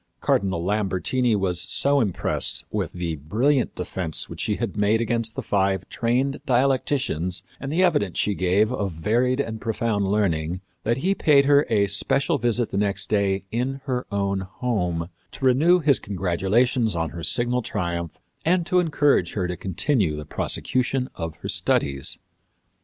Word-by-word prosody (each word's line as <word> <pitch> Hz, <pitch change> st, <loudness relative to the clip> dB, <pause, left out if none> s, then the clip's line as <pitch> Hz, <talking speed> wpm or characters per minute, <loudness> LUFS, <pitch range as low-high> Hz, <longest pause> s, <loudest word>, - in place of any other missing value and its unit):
Cardinal 95 Hz, -4 st, 0 dB
Lambertini 105 Hz, +4 st, +1 dB
was 95 Hz, -3 st, 0 dB
so 140 Hz, 0 st, +1 dB
impressed 100 Hz, -7 st, 0 dB
with -, -, -2 dB
the 85 Hz, -3 st, -3 dB
brilliant 120 Hz, -, +1 dB
defence 90 Hz, -3 st, -2 dB
which -, -, -9 dB
she 105 Hz, -, 0 dB
had 115 Hz, -3 st, -3 dB
made 105 Hz, +2 st, +2 dB
against 115 Hz, -1 st, -1 dB
the -, -, -4 dB
five 95 Hz, -2 st, 0 dB
trained 130 Hz, +4 st, 0 dB
dialecticians 125 Hz, -, 0 dB, 0.2 s
and 135 Hz, +1 st, -5 dB
the 175 Hz, +4 st, +2 dB
evidence 145 Hz, -, +1 dB
she 105 Hz, -, +1 dB
gave 95 Hz, +4 st, +2 dB
of 105 Hz, -6 st, -2 dB
varied 120 Hz, -, +1 dB
and 110 Hz, -5 st, -3 dB
profound 110 Hz, -3 st, -1 dB
learning 90 Hz, -4 st, 0 dB, 0.2 s
that 115 Hz, +1 st, 0 dB
he 195 Hz, -, +3 dB
paid 145 Hz, -7 st, +4 dB
her 145 Hz, +1 st, +4 dB
a 105 Hz, -3 st, +3 dB
special 135 Hz, -, +1 dB
visit 120 Hz, 0 st, 0 dB
the -, -, -2 dB
next 100 Hz, -1 st, 0 dB
day 100 Hz, -2 st, +1 dB
in 130 Hz, +4 st, -2 dB
her 130 Hz, -3 st, -2 dB
own 100 Hz, -1 st, 0 dB
home 95 Hz, -4 st, -2 dB, 0.2 s
to 135 Hz, -, -5 dB
renew 150 Hz, +8 st, +5 dB
his 145 Hz, -6 st, +3 dB
congratulations 100 Hz, +5 st, +1 dB
on 80 Hz, -1 st, -1 dB
her 85 Hz, -1 st, -7 dB
signal 120 Hz, +5 st, +1 dB
triumph 85 Hz, -6 st, -4 dB, 0.2 s
and 175 Hz, +1 st, +2 dB
to 180 Hz, +1 st, +2 dB
encourage 145 Hz, -, +2 dB
her 95 Hz, -4 st, -1 dB
to 90 Hz, -, -3 dB
continue 95 Hz, -, 0 dB
the 75 Hz, 0 st, -6 dB
prosecution 130 Hz, -, -1 dB
of 80 Hz, -2 st, -5 dB
her -, -, -8 dB
studies. 70 Hz, -1 st, 0 dB
105 Hz, 160 wpm, -24 LUFS, 95-130 Hz, 0.2 s, renew